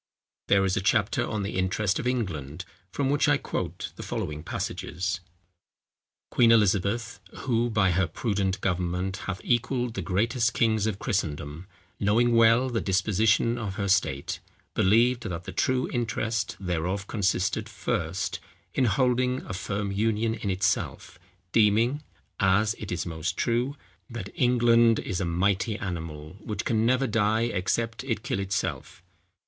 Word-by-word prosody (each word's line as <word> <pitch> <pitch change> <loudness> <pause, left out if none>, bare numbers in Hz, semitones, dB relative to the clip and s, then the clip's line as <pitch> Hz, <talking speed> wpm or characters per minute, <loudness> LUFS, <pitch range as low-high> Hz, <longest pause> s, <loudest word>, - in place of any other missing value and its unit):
There 100 -1 +4
is 95 0 +1
a - - 0
chapter 100 +1 +1
on 105 -1 -2
The 100 - -4
Interest 95 +2 0
of 125 - -2
England, 90 - -3 0.3
from 135 +7 0
which 145 +1 +3
I 145 - +4
quote - - -4
the - - -6
following 75 0 -4
passages: 90 +3 -3 1.1
"Queen 115 -2 +5
Elizabeth 105 +1 +2 0.2
(who 120 -2 +1
by 105 -4 +3
her 90 +1 +2
prudent 100 +2 -1
government 90 +1 -1
hath 95 -2 -3
equalled 120 0 0
the 95 - -3
greatest 115 - +1
kings 110 -2 +2
of 105 -3 -2
Christendom), 80 - -3 0.3
knowing 115 +4 +3
well 115 +3 +5
the 115 - 0
disposition 105 +4 +2
of 100 -5 -4
her 100 0 -2
state, 95 -8 +1 0.3
believed 120 +5 +3
that 85 -1 -5
the 95 - -7
true 130 +7 +1
interest 115 -2 -1
thereof 90 +1 -2
consisted, 100 +1 0
first 95 -3 -2 0.3
in 130 - +2
holding 125 +3 +1
a - - -5
firm 100 +2 -3
union 110 +2 +1
in 110 -2 -4
itself, 95 0 -1 0.3
deeming 115 +6 +3 0.4
(as 100 +3 +3
it 105 - -6
is 85 -3 -2
most 80 0 -3
true) 120 +4 0 0.3
that 115 -5 -6
England 120 -2 +4
is 95 -3 -3
a - - 0
mighty 100 +5 +1
animal, 80 -4 -6
which 105 0 -4
can 110 0 +2
never 130 +2 +3
die 110 -1 +2
except 115 +2 -1
it 115 -5 -2
kill 125 - -2
itself. 95 -2 -3
105 Hz, 145 wpm, -27 LUFS, 95-115 Hz, 1.1 s, Queen